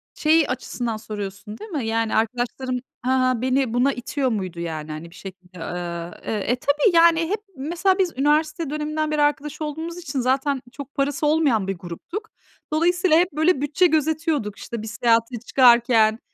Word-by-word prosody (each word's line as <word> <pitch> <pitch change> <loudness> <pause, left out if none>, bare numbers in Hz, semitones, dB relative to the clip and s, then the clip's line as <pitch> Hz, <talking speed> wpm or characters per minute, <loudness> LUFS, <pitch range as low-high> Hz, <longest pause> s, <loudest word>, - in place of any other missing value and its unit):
şeyi 315 0 +3
açısından 240 -3 -3
soruyorsun, 210 0 -7
değil 435 - -10
mi? 285 -8 -2
Yani, 225 0 0
arkadaşlarım, 245 +3 -1 0.2
ha 255 - -1 0.2
ha, 250 -3 -1
beni 260 -2 +1
buna 260 +3 +2
itiyor 260 +2 -2
muydu? 185 -6 -3
Yani, 155 -2 -5
hani, 155 +2 -7
bir - - -17
şekilde, 185 -1 -11
ııı, 170 0 -5
eee, - - -2
e, 215 +3 0
tabii. 285 - +2
Yani, 335 0 +5
hep 415 +2 -1 0.2
mesela 345 +7 +1
biz 365 -3 +1
üniversite 300 +2 +1
döneminden 305 +1 -2
beri 300 -1 +1
arkadaş 295 +1 0
olduğumuz 320 +3 -4
için 330 -6 -4
zaten 265 +2 +1
çok 280 0 -9
parası 280 +2 0
olmayan 285 -10 +2
bir 195 -1 -2
gruptuk. 185 - -7 0.4
Dolayısıyla 350 +1 +3
hep, 355 +2 +2
böyle, 315 +1 +2
bütçe 295 +5 +2
gözetiyorduk, 310 - 0
işte, 235 -2 -6
bir 220 - -7
seyahate 230 +2 +1
çıkarken. 235 -3 +5
265 Hz, 170 wpm, -23 LUFS, 220-310 Hz, 0.4 s, Yani